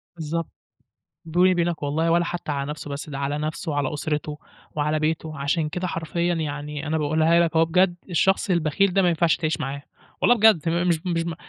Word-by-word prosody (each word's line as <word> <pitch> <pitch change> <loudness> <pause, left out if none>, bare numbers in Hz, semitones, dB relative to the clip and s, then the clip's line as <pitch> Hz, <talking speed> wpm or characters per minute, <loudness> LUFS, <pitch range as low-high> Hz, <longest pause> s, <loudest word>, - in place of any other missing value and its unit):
بالضبط. 165 0 -4 0.7
بيني 175 +3 +3
وبينَك 170 -3 0
والله 160 +3 0
ولا 170 +1 +3
حتّى 175 -3 -4
على 140 0 -3
نفسه 150 0 -6
بس، 140 +2 -6
ده 140 -2 -5
على 140 +1 -1
نفسه 155 +1 -3
وعلى 145 -1 -1
أسرته 150 0 -3 0.4
وعلى 150 +1 0
بيته. 155 0 -2
عشان 150 +3 0
كده 180 +3 -3
حرفيًا 170 +1 -1
يعني 150 -1 -4
أنا 160 +1 0
باقولها 160 +2 +3
لك 170 -1 +1
أهو 160 0 +5
بجد، 175 +2 +2
الشخص 190 +4 +2
البخيل 175 +2 +2
ده 195 - +4
ما 180 - +3
ينفعش 170 0 +2
تعيش 160 0 -1
معاه 140 -1 -4 0.4
والله 245 - +5
بجد. 220 -5 +5
تم 170 +3 0
مش 170 -2 +3
ب 185 - -8
مش 165 -2 0
ب 170 0 -3
160 Hz, 205 wpm, -24 LUFS, 150-175 Hz, 0.7 s, أهو